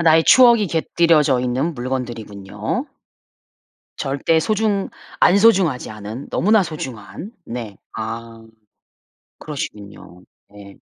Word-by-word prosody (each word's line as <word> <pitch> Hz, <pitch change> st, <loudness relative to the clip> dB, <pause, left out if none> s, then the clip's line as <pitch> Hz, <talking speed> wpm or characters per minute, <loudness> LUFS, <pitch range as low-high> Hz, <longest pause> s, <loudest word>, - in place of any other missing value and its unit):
야 -, -, 0 dB
나의 160 Hz, -1 st, +5 dB
추억이 235 Hz, -4 st, +6 dB
곁들여져 160 Hz, -5 st, +2 dB
있는 130 Hz, +7 st, -1 dB
물건들이군요. 120 Hz, -, -4 dB, 1.1 s
절대 145 Hz, +4 st, +1 dB
소중 210 Hz, +1 st, 0 dB, 0.3 s
안 180 Hz, -, +5 dB
소중하지 190 Hz, -, +3 dB
않은 110 Hz, +5 st, -8 dB
너무나 215 Hz, +2 st, +3 dB
소중한. 155 Hz, -, -7 dB
네. 115 Hz, -4 st, -7 dB, 0.2 s
아 115 Hz, 0 st, -7 dB, 0.9 s
그러시군요. 100 Hz, -, -8 dB, 0.3 s
네. 100 Hz, -1 st, -14 dB
135 Hz, 235 characters per minute, -20 LUFS, 110-170 Hz, 1.1 s, 추억이